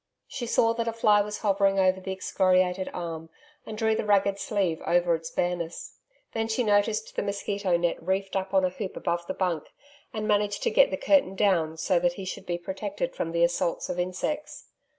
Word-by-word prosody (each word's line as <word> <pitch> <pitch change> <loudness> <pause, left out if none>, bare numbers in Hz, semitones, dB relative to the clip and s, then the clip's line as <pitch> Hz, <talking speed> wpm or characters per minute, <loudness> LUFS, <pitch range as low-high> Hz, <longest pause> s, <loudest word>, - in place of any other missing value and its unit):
She 245 -3 -5
saw 230 0 +3
that 230 0 -2
a 230 - -1
fly 210 -2 +4
was 210 +1 -5
hovering 195 -1 +2
over 190 -1 +3
the 190 - -5
excoriated 185 -1 +1
arm 165 -2 -6 0.4
and 215 - -6
drew 220 0 +2
the - - -1
ragged 200 -1 +2
sleeve 190 -7 -1
over 175 0 +2
its 160 0 -3
bareness. 175 -2 -3 0.3
Then 225 0 -1
she 225 +3 0
noticed 210 0 +1
the - - 0
mosquito 200 -2 -1
net 170 0 -1
reefed 190 +3 -2
up 190 0 -2
on 190 -1 +3
a - - +1
hoop 190 +1 -6
above 170 -1 -2
the - - -3
bunk, 175 -5 -1 0.5
and 215 -1 -3
managed 205 -1 +1
to 470 - +1
get - - +5
the - - -2
curtain 290 - +3
down 170 -6 +1
so 170 +2 +2
that 175 0 +1
he 190 +1 -7
should 185 - -6
be 175 -1 -1
protected 190 0 -4
from 165 - -3
the 170 0 +2
assaults 170 0 0
of 180 - -3
insects. 185 +12 -3
190 Hz, 205 wpm, -27 LUFS, 175-210 Hz, 0.5 s, get